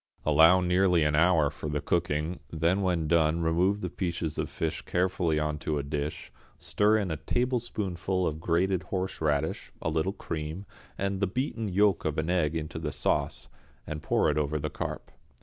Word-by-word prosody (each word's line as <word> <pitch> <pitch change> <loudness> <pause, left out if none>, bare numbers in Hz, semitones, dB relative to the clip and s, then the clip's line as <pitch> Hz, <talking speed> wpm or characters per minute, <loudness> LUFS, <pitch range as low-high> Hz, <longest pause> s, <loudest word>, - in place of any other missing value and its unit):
Allow 80 +4 +6
nearly 90 -1 +3
an 75 0 +1
hour 80 -2 +4
for 75 - -6
the 75 0 -1
cooking, 85 +1 -1
then 85 +5 +1
when 90 -4 0
done 80 0 +3
remove 90 +5 +2
the 90 - -3
pieces 85 -4 -3
of - - -2
fish 80 -1 -3
carefully 90 -3 0
on 75 0 -1
to 75 0 -2
a 70 - -2
dish, 75 +2 -4 0.3
stir 105 +1 +2
in 100 -5 -1
a 80 - -2
tablespoonful 100 - -1
of 80 -1 -2
grated 90 +3 +1
horseradish, 80 -6 -2
a 80 - -2
little 80 +5 0
cream, 80 +1 -5 0.3
and 100 0 -1
the 100 - +1
beaten 115 +1 -2
yolk 100 +1 +3
of 75 -1 -2
an 80 +2 0
egg 80 -3 +1
into 80 0 -4
the 75 -2 -3
sauce, - - -1 0.4
and 75 -1 -5
pour - - +2
it 75 - 0
over 75 +1 0
the 75 - -3
carp. - - -5
85 Hz, 180 wpm, -28 LUFS, 75-95 Hz, 0.4 s, Allow